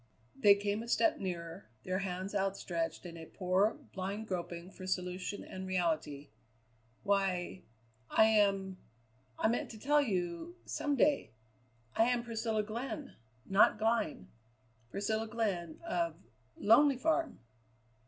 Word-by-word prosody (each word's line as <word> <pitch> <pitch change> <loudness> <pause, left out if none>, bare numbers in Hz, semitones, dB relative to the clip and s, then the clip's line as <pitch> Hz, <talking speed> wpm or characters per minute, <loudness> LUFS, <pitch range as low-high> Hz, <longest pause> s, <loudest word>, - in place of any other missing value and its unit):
They 210 -7 +7
came 205 +1 -1
a 230 - -7
step 320 +6 +3
nearer, 170 - -5
their 185 +1 -1
hands 190 +1 -3
outstretched 190 -4 -2
in 170 -1 -7
a 160 -1 -9
poor, 190 +3 +1 0.2
blind 200 +3 -4
groping 175 -1 -4
for 185 -1 -9
solution 180 +1 -2
and 190 0 -7
reality. 160 -6 -1 0.7
"Why 195 -3 0 0.5
I 220 - +6
am 195 -3 +2 0.6
I - - +2
meant 230 - 0
to 225 - -9
tell 295 +5 +4
you 190 - -2
some 290 -1 -1
day. 285 - +2 0.6
I 225 - +5
am 245 -1 +1
Priscilla 225 -2 -1
Glenn 250 +7 -5 0.3
not 195 +2 +5
Glynn 215 - 0 0.6
Priscilla 220 - -1
Glenn 200 -8 -2
of 335 0 0 0.4
Lonely 275 +1 +5
Farm." 320 +4 +1
200 Hz, 125 wpm, -33 LUFS, 180-230 Hz, 0.7 s, They